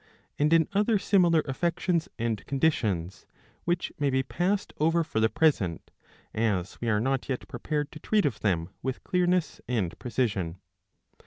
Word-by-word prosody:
I. - - -29 0.2
and 150 +2 +3
in 165 -1 +5
other 210 +2 +3
similar 175 -5 +3
affections 170 +4 0
and 115 -3 -2
conditions, 110 - 0 0.4
which 175 0 -1
may 145 -1 +2
be 130 0 +1
passed 190 +8 -1
over 165 +2 +3
for 150 -8 -2
the 110 0 +3
present, 135 - +1 0.4
as 100 -5 -1
we 120 - 0
are 105 -1 +3
not 130 +4 -1
yet 130 - -3
prepared 150 -2 -3
to 155 - -10
treat 210 0 +2
of 125 -7 -1
them 90 -4 0
with 130 0 -3
clearness 180 -3 +1
and 105 -9 0
precision. 105 -9 -1
140 Hz, 160 wpm, -28 LUFS, 110-170 Hz, 0.4 s, in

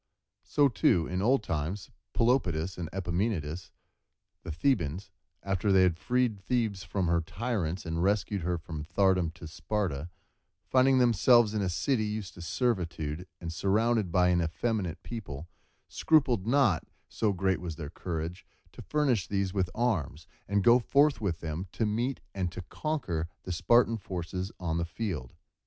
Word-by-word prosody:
So 145 -1 +3
too, 95 -7 +2
in 90 +1 -2
old 120 +2 +3
times, 80 +4 -3 0.2
Pelopidas 95 -9 +1
and 85 -3 -5
Epaminondas 90 -3 -2 0.7
the - - -6
Thebans, 90 - 0 0.3
after 95 +1 0
they 95 -1 +6
had 90 -3 +3
freed 125 -4 +1
Thebes 105 -1 -1
from 95 0 -1
her 85 0 +2
tyrants, 95 -2 -3
and 85 0 -2
rescued 100 +1 +1
her 90 +1 -1
from 80 -2 -6
thraldom 90 +1 +2
to 85 0 -9
Sparta, 85 -3 -3 0.6
finding 130 0 +4
themselves 120 -2 +5
in 105 - 0
a 95 - 0
city 110 +7 0
used 105 -2 -4
to 85 - -11
servitude 85 - -2
and 85 -1 -5
surrounded 105 +1 +1
by 90 0 +4
an 90 -1 +3
effeminate 90 +1 -2
people, 85 - -7 0.4
scrupled 130 -10 +2
not, 120 - +3 0.2
so 110 -2 0
great 95 -1 0
was 85 -3 -5
their 75 -2 -7
courage, 85 0 -4 0.3
to - - -11
furnish 135 -10 +1
these 100 -2 -1
with 95 -3 0
arms, 85 - -1 0.2
and 100 0 +1
go 120 +3 +7
forth 140 +3 +3
with 90 -6 -2
them 80 +3 -4
to 115 - 0
meet 120 +5 -1
and 90 -3 -2
to 90 - -7
conquer 85 - -3
the 95 - -5
Spartan 115 +6 +3
forces 95 -1 -5
on 85 -2 -1
the 85 - 0
field. 85 - -4
95 Hz, 155 wpm, -29 LUFS, 85-115 Hz, 0.7 s, go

